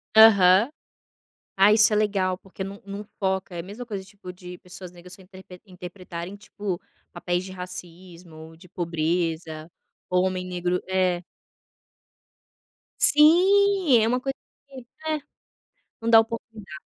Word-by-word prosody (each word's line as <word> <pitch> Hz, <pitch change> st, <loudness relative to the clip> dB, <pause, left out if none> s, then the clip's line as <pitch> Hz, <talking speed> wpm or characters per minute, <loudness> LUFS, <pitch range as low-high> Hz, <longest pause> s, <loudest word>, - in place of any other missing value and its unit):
Aham. 205 Hz, 0 st, +7 dB, 0.9 s
Ah, 200 Hz, +2 st, +5 dB
isso 220 Hz, 0 st, +5 dB
é -, -, +2 dB
legal 195 Hz, -3 st, 0 dB
porque 190 Hz, 0 st, -9 dB
não 195 Hz, +1 st, -9 dB
não 200 Hz, +1 st, -7 dB, 0.2 s
foca, 190 Hz, -1 st, -2 dB
é 170 Hz, -, -5 dB
a -, -, -5 dB
mesma 205 Hz, +7 st, -9 dB
coisa 200 Hz, -5 st, -6 dB
tipo 190 Hz, -2 st, -12 dB
de 180 Hz, 0 st, -11 dB
pessoas 180 Hz, 0 st, -10 dB
negras 180 Hz, 0 st, -15 dB
se -, -, -14 dB
interprete 185 Hz, -1 st, -15 dB
interpretarem 180 Hz, 0 st, -9 dB
tipo, 205 Hz, -3 st, -6 dB, 0.3 s
papéis 175 Hz, +1 st, -3 dB
de 190 Hz, -, -9 dB
racismo, 175 Hz, -3 st, -9 dB
de 180 Hz, -, -17 dB
pobreza, 165 Hz, -1 st, -3 dB, 0.4 s
ou 180 Hz, 0 st, +2 dB
homem 185 Hz, -1 st, -3 dB
negro 180 Hz, 0 st, -2 dB
é. 185 Hz, -2 st, 0 dB, 1.8 s
Sim, 365 Hz, +1 st, +6 dB
é 220 Hz, -, +2 dB
uma 250 Hz, +2 st, 0 dB
coisa 270 Hz, 0 st, -3 dB, 0.3 s
de 260 Hz, -3 st, -11 dB, 0.2 s
é, 310 Hz, -1 st, -1 dB, 0.8 s
não 230 Hz, -, -4 dB
dar 225 Hz, -1 st, +8 dB
oportunidade. 225 Hz, -6 st, -8 dB
185 Hz, 140 wpm, -24 LUFS, 180-215 Hz, 1.8 s, dar